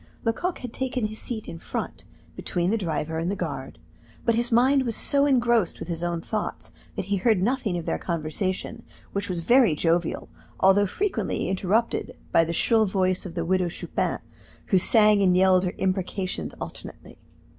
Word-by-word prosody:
Lecoq 340 +11 -1
had 245 -2 -8
taken 255 -3 -2
his 215 +1 -5
seat 225 -3 -4
in 165 - -7
front, - - -5 0.3
between 175 +1 -1
the 225 - +2
driver 160 -3 -2
and 165 +2 -1
the 200 - -1
guard; 145 -8 -5 0.5
but 230 - +3
his 235 +1 +1
mind 260 +4 +4
was 235 -4 -1
so 280 0 +3
engrossed 235 -8 +2
with - - -8
his 165 -1 -2
own 175 -1 -2
thoughts 215 +4 -4 0.2
that - - -3
he 200 +1 0
heard 215 +1 +2
nothing 215 -2 0
of 170 - -5
their - - -1
conversation, 185 +7 -3 0.3
which 200 0 -3
was 175 -2 -2
very 235 - +4
jovial, 165 +2 0 0.3
although 195 +2 +5
frequently 260 - -2
interrupted 195 +5 0
by 165 - +5
the 165 - -3
shrill 220 +5 +2
voice 185 -1 0
of 170 - -10
the 170 -2 -2
Widow 185 0 +1
Chupin, - - -2 0.5
who 190 - +4
sang 210 +1 +5
and 180 -2 +4
yelled 185 0 +4
her 180 - -3
imprecations 185 0 -2
alternately. - - -9
190 Hz, 175 wpm, -25 LUFS, 175-230 Hz, 0.5 s, although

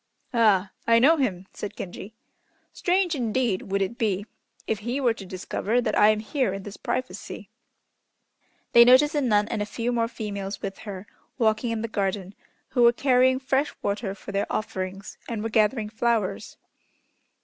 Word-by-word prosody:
"Ah! 205 -5 +3 0.2
I 230 0 +6
know 290 +8 +5
him," 195 - -1
said 205 - -7
Genji. 195 +4 -8 0.6
"Strange, 360 -1 +1
indeed, 235 -7 -1
would 195 0 +2
it 235 +6 -5
be 205 -4 0 0.4
if 220 - -1
he 240 +5 -2
were 245 -4 +2
to 195 -4 -10
discover 195 +5 -1
that 240 -3 0
I 210 - +6
am 215 0 +2
here 250 -2 -1
in 195 0 -6
this 205 0 -8
privacy." 255 0 -5 1.2
They 235 - +10
noticed 260 +6 +6
a 295 - +1
nun 210 -5 +2
and 220 - -2
a - - 0
few 235 +3 -2
more 230 -1 +1
females 200 -4 -5
with 195 - -6
her 195 0 -7 0.3
walking 225 0 +1
in 225 -1 -2
the - - -1
garden, 195 -2 -2 0.4
who 245 - 0
were 235 0 +7
carrying 260 0 +3
fresh 270 +2 0
water 200 -1 -2
for 200 - -9
their 200 0 -1
offerings, 190 -1 -4
and 225 -3 -3
were 225 - -2
gathering 215 0 +2
flowers. 225 -2 -1
220 Hz, 170 wpm, -25 LUFS, 200-245 Hz, 1.2 s, They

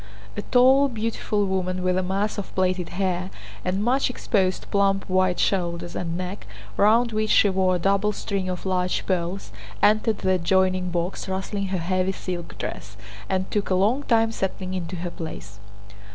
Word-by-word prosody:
A 205 - -2
tall, 260 +5 +5
beautiful 220 -3 -1
woman 185 -1 -1
with 185 0 +2
a 185 - +2
mass 195 +3 -1
of 200 - -8
plaited 185 -1 0
hair 185 -1 0 0.3
and 190 +3 -1
much 255 +4 +2
exposed 190 -6 0
plump 195 -1 +2
white 185 -1 +2
shoulders 175 -2 0
and 170 -1 -3
neck, 180 - -5 0.3
round 230 +3 +4
which 215 0 0
she 205 - +5
wore 185 -1 +2
a - - +1
double 200 +3 +2
string 195 -2 -3
of 180 0 -4
large 180 -1 0
pearls, 180 - -2 0.3
entered 215 - +3
the 190 - 0
adjoining 185 0 +2
box 175 +2 -3
rustling 195 +1 -2
her 190 0 -1
heavy 185 +2 0
silk 175 -3 -6
dress 105 +1 -6 0.3
and 185 0 -1
took 205 -1 -1
a 185 - +2
long 215 +9 +2
time 225 -4 +2
settling 190 -3 -3
into 180 -1 -4
her 175 0 -4
place. 105 - -8
190 Hz, 170 wpm, -24 LUFS, 180-205 Hz, 0.3 s, tall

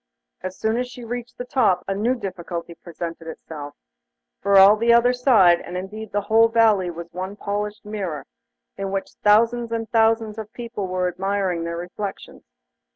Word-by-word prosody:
As 185 0 -6
soon 220 +1 0
as 250 0 -1
she 250 0 -10
reached 240 +1 -6
the 245 - -5
top 220 -8 +2
a 195 - 0
new 225 +6 +1
difficulty 175 -5 -6
presented 165 -1 -8
itself, 150 -3 -8 0.7
for 200 0 +4
all 195 +2 +9
the 230 +2 +2
other 235 +1 +5
side, 220 -9 +5
and 180 +1 -6
indeed 210 +3 -7
the 205 - 0
whole 225 +3 +4
valley, 220 -5 +3
was 170 0 -8
one 185 +3 -5
polished 205 +1 -4
mirror, 195 -8 -4 0.5
in 195 0 -3
which 195 0 -3
thousands 230 +3 +3
and 225 -1 -2
thousands 225 -1 +2
of 215 -1 -7
people 235 -5 -5
were 185 0 -1
admiring 190 -2 -1
their 170 0 -4
reflections. 180 - -7
205 Hz, 170 wpm, -23 LUFS, 180-230 Hz, 0.7 s, all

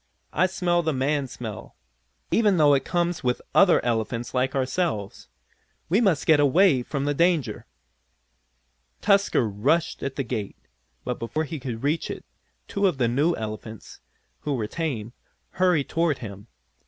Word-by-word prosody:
I 185 +4 +3
smell 175 -2 +1
the 160 -2 -1
man 140 +1 0
smell, 120 -4 -8 0.6
even 210 -5 +3
though 150 -2 +5
it 135 - +2
comes 175 -2 -1
with 125 -1 +1
other 180 -10 +5
elephants 115 0 -2
like 130 +2 0
ourselves. 130 - -2 0.6
We 195 +7 +3
must 190 -10 +2
get 155 -2 +5
away 145 0 +4
from 140 +3 -3
the 145 - +1
danger!" 170 -2 +1 1.3
Tusker 200 - +3
rushed 125 +12 0
at 135 -1 -4
the 140 - -1
gate, 105 -4 -4 0.5
but 125 - -3
before 135 +7 -2
he 160 0 -5
could 125 -3 -6
reach 150 +3 0
it - - -6 0.4
two 200 0 +1
of 175 -7 -1
the 125 -3 +2
new 145 +9 +2
elephants, 110 0 -7 0.4
who 145 -2 -2
were 115 -4 -2
tame, 120 -5 -4 0.4
hurried 180 -6 +2
toward 165 -4 +1
him. 100 -3 -9
140 Hz, 155 wpm, -25 LUFS, 120-170 Hz, 1.3 s, though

